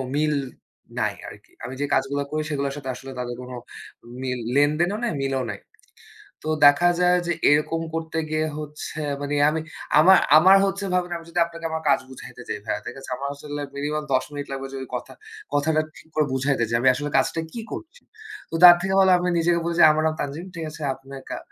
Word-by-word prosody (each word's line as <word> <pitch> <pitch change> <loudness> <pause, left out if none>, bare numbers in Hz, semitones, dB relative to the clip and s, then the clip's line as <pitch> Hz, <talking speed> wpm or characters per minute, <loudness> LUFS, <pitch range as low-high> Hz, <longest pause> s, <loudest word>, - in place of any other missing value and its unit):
মিল 150 0 +1 0.6
নাই - - 0
আরকি। - - -13
আমি 125 +2 -5
যে, 145 - +1
কাজগুলা 140 +2 0
করি 155 0 -1
সেগুলোর 140 -2 -2
সাথে 135 -2 -6
আসলে 135 +1 -9
তাদের 120 -1 -4
কোন 125 0 -9 0.7
মিল, 125 -1 -2 0.2
লেনদেনও 155 +7 +2
নাই, 240 - 0
মিলও 135 -1 -1
নাই। - - -5 0.8
তো - - -6 0.2
দেখা 145 +5 +6
যায় 180 0 +4
যে, - - +1 0.2
এরকম 150 +2 +2
করতে 160 0 -4
গিয়ে 155 0 0
হচ্ছে 150 0 -7 0.2
মানে 145 0 -3 0.2
আমি, 160 +1 -1 0.4
আমার, 190 +5 +8 0.2
আমার 185 +5 +7
হচ্ছে 195 0 -2
ভাবেন, 180 -1 0
আমি 165 - -12
যদি 175 - -2
আপনাকে 170 0 -9
আমার 160 0 -2
কাজ - - +4
বুঝাইতে 130 -1 -11
যাই 110 - -3
ভাইয়া, - - -2
ঠিক 125 - -6
আছে? 135 - -11
আমার 140 - -4
আসলে 145 +1 -6
মিনিমাম 150 +2 -2
১০ 130 - +3
মিনিট 145 -1 -6
লাগবে 135 0 -4
যদি 130 -1 -5
কথা, - - -6 0.4
কথাটা 155 +2 +2 0.2
ঠিক - - -16
করে 155 -1 +3
বুঝাইতে 130 -1 +1
চাই, 115 - +2
আমি 130 - +5
আসলে 145 +1 -3
কাজটা 135 +4 +1
কি 235 - -6
করছি? 335 +9 -8 0.5
তো - - -5
তার 175 -1 +12
থেকে 190 +1 -1
ভালো 190 -1 +5
আমি 180 0 -1
নিজে 165 +1 +1
গিয়ে 170 -1 -1
বলি 170 0 -1
যে, - - +8
"আমার 155 +1 0
নাম 155 - -1
তানজিম," 145 +5 -4
ঠিক 165 -1 -4
আছে? 155 +1 -11
"আপনি 135 +1 -16 0.2
কা - - -4
150 Hz, 210 wpm, -23 LUFS, 135-170 Hz, 0.8 s, তার